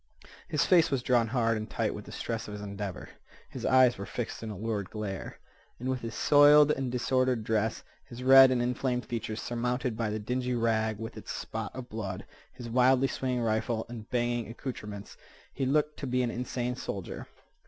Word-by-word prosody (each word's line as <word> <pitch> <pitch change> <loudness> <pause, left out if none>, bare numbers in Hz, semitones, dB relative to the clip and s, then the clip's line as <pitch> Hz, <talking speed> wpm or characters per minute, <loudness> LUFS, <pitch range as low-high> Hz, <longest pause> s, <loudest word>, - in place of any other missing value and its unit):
His 150 - +1
face 170 -3 +5
was 135 -3 -1
drawn 120 -3 +3
hard 115 -1 +1
and 110 0 -5
tight - - -1
with - - -8
the - - -10
stress 115 -1 -4
of 105 - -7
his 105 - -7
endeavor. 100 -2 -6 0.4
His - - -4
eyes 130 -4 +5
were 100 - -5
fixed 120 - -5
in 110 - -5
a 105 - -6
lurid 105 -2 -3
glare. 105 -4 -5 0.4
And 125 - -4
with 130 -1 -1
his 115 -1 -5
soiled 145 0 +6
and 135 -4 -1
disordered 125 -1 +1
dress, 110 -1 0 0.2
his 120 +1 -9
red 135 0 +9
and 125 -2 +1
inflamed 125 0 -1
features 110 -2 -4
surmounted 125 0 -2
by 115 -1 -1
the 105 - -2
dingy 125 +3 -2
rag 110 -2 +1
with 115 +1 -7
its - - -7
spot - - -5
of 130 -1 -7
blood, 110 -4 -5 0.3
his 120 - -9
wildly 130 +3 +4
swinging 125 -2 -2
rifle, 110 0 0
and 115 -3 -8
banging 120 -1 0
accouterments, 105 -5 -7 0.4
he 135 - -1
looked 150 +2 +1
to 140 - -4
be 125 0 +1
an 120 - -1
insane 125 0 -3
soldier. 100 -6 -6
120 Hz, 195 wpm, -29 LUFS, 110-130 Hz, 0.4 s, red